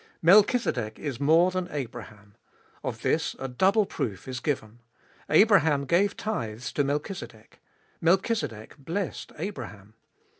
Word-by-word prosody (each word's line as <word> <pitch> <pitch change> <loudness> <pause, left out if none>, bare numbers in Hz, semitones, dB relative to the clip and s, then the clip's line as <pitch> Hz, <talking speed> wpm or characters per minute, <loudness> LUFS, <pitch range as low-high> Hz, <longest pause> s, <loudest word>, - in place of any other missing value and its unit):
Melchizedek 175 - +4
is 140 -5 -5
more 165 +5 +4
than 185 -1 -2
Abraham; 115 - -7 0.5
of - - -5
this - - 0
a 135 - -4
double 190 - +3
proof 100 - -4
is 130 -1 -4
given. 120 -5 -3 0.5
Abraham 160 -6 +4
gave 190 +8 +2
tithes 115 - -4
to 145 - +1
Melchizedek; 140 - -5 0.4
Melchizedek 170 - 0
blessed 170 +7 -4
Abraham. 105 - -7
145 Hz, 115 wpm, -27 LUFS, 115-185 Hz, 0.5 s, Melchizedek